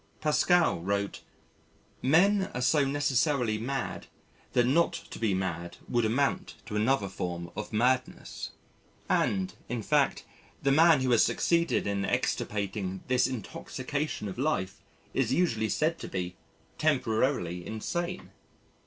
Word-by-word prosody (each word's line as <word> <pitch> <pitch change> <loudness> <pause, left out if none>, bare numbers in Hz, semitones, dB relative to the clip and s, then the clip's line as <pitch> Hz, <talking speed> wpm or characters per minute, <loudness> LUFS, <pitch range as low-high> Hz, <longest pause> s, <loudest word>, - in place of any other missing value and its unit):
Pascal 165 - +3
wrote: 100 +3 -2 0.8
"Men 190 +8 +4
are 125 - -2
so 145 +3 +3
necessarily 135 -4 +1
mad 135 +4 -3 0.5
that 120 - +4
not 160 +7 +3
to - - -8
be 110 -4 +1
mad 85 -2 -3
would 120 -2 +1
amount 135 +6 0
to 105 - -6
another 110 0 +2
form 85 -2 -5
of 105 - -5
madness." 125 +3 0 0.6
And, 95 -1 +1 0.2
in 120 -2 -3
fact, 145 0 +2 0.4
the 140 - +3
man 160 0 +6
who 130 -1 +1
has 115 - +6
succeeded 170 0 +1
in 100 -1 -1
extirpating 100 -2 -2
this 130 -1 +3
intoxication 130 +2 -4
of 100 +4 -6
life 135 -10 -1 0.3
is 130 -2 +1
usually 115 -10 +1
said 160 +2 0
to - - -6
be 90 -1 -4 0.4
"temporarily 115 - +1
insane." 170 - -4
125 Hz, 125 wpm, -29 LUFS, 100-145 Hz, 0.8 s, man